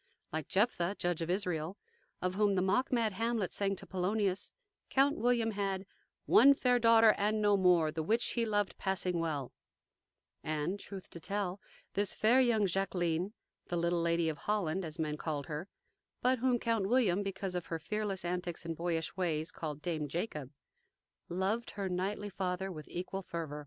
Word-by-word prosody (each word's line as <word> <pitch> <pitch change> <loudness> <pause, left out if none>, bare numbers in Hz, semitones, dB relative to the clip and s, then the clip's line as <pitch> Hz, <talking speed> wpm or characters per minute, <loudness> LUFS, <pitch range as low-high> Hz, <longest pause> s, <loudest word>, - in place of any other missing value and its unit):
Like 160 -2 -2
"Jephtha, 195 -3 +1
Judge 175 -2 -1
of 165 - -2
Israel," 180 -1 -1 0.5
of 180 0 0
whom 205 0 +2
the 185 - +2
mock 225 +8 +1
mad 230 -4 +2
Hamlet 225 -1 -1
sang 195 -1 0
to - - -8
Polonius, 190 +1 0 0.4
Count 280 +2 +3
William 235 -2 +2
had 195 -2 -2 0.4
"One 275 +4 +7
fair 250 -2 +3
daughter, 230 -1 +7
and 210 +2 +2
no 205 -1 +4
more, 180 -5 +4
The 160 0 -3
which 225 +9 +1
he 235 - 0
loved 205 -3 0
passing 180 -2 0
well;" 150 -6 -2 0.9
and, 155 +6 -2
truth 195 -2 -8
to 170 - -7
tell, 195 +1 -2 0.3
this 200 0 +1
fair 240 +5 +5
young 230 -5 +3
Jacqueline, 180 -1 0 0.3
the 175 - -2
little 170 0 +1
"Lady 170 0 +2
of 155 -3 -2
Holland," 190 -1 0
as 160 -1 -6
men 155 -2 -2
called 150 -3 -3
her, 155 +7 -5 0.5
but 255 0 +2
whom 250 0 +3
Count 225 -4 0
William, 215 -7 +3
because 195 -1 -3
of 180 -2 -3
her 165 - -2
fearless 195 +2 -2
antics 175 -1 -3
and 165 0 -3
boyish 165 -1 -2
ways, 165 -4 -1
called 150 -2 -6
"Dame 155 -3 -2
Jacob," 150 - -3 0.8
(1) 175 - -5
loved 215 +5 0
her 200 -1 -1
knightly 195 +3 -2
father 190 0 -2
with 155 -4 -8
equal 185 +2 -4
fervor. 160 -5 -5
190 Hz, 175 wpm, -33 LUFS, 170-210 Hz, 0.9 s, One